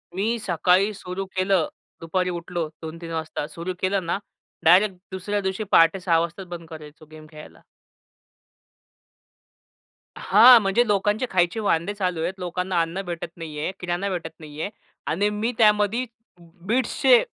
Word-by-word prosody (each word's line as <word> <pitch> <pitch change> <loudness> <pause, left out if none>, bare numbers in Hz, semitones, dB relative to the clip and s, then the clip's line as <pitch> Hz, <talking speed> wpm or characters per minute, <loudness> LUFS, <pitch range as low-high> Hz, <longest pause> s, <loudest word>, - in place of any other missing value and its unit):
मी 220 +5 0
सकाळी 185 +2 +2
सुरु 185 0 -6
केलं. 185 -3 +2 0.3
दुपारी 180 +2 -1
उठलो 175 -1 -4
2-3 165 +1 -7
वाजता. 160 -2 -3
सुरु 170 +4 -5
केलं 190 -1 0
ना 175 - -1 0.5
डायरेक्ट 185 +4 +5 0.2
दुसऱ्या 205 +2 -2
दिवशी 190 +2 -2
पहाटे 165 +3 +5
06:00 170 -3 +2
वाजताच 170 +3 -4
बंद 170 -1 -8
करायचो 155 -1 -11
गेम 155 0 -12
खेळायला. 150 -1 -13 2.6
हां. 250 -2 +8
म्हणजे 200 +4 +2
लोकांचे 205 +3 +1
खायचे 175 +2 +1
वांदे 200 -2 0
चालू 180 -5 -2
आहेत. 175 +3 -1
लोकांना 180 0 -1
अन्न 165 +4 -3
भेटत 170 -1 -5
नाहीये, 155 0 -4
किराणा 180 +2 -2
भेटत 175 -3 -4
नाहीये. 155 +4 -6 0.4
आणि 200 +6 +1
मी 215 +3 -2
त्यामध्ये 210 +2 +3 0.6
Beatsचे 260 - +4
180 Hz, 135 wpm, -24 LUFS, 165-200 Hz, 2.6 s, हां